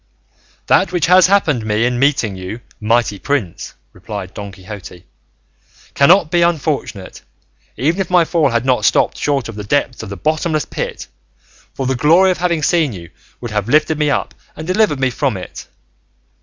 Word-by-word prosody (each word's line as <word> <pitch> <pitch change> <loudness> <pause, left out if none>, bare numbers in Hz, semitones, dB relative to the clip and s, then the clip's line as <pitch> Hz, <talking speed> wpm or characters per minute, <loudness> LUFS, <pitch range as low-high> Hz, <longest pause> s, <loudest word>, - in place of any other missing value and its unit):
"That - - +3
which 175 -3 +1
has 180 0 +6
happened 160 - +2
me 110 +2 0
in 125 0 0
meeting 135 -7 +1
you, 95 +5 -7 0.2
mighty 110 -2 +1
prince," 125 - -3 0.2
replied 100 -3 -7
Don 100 -1 -7
Quixote, 95 -2 -11 0.9
"cannot 165 +3 +4
be 175 - +2
unfortunate, 150 - -2 0.6
even 165 +8 0
if 185 - -4
my 180 -2 +4
fall 160 -4 +1
had 120 0 -1
not 125 -5 +1
stopped - - +2
short 140 -4 -1
of 115 - -7
the 105 0 -7
depths 130 +3 -1
of 110 - -8
the 100 - -7
bottomless 155 - -1
pit, - - -5 0.7
for 135 - -3
the 130 - +1
glory 165 +9 +4
of 180 - -3
having 170 -3 0
seen 155 -5 +2
you 85 -3 -10 0.3
would 120 -2 -6
have 105 +1 -2
lifted 155 +2 +2
me 150 -1 +2
up - - -1 0.2
and 155 - -7
delivered 185 -5 +1
me 130 -1 +1
from 130 -6 -1
it. 90 - -9
135 Hz, 175 wpm, -17 LUFS, 105-160 Hz, 0.9 s, has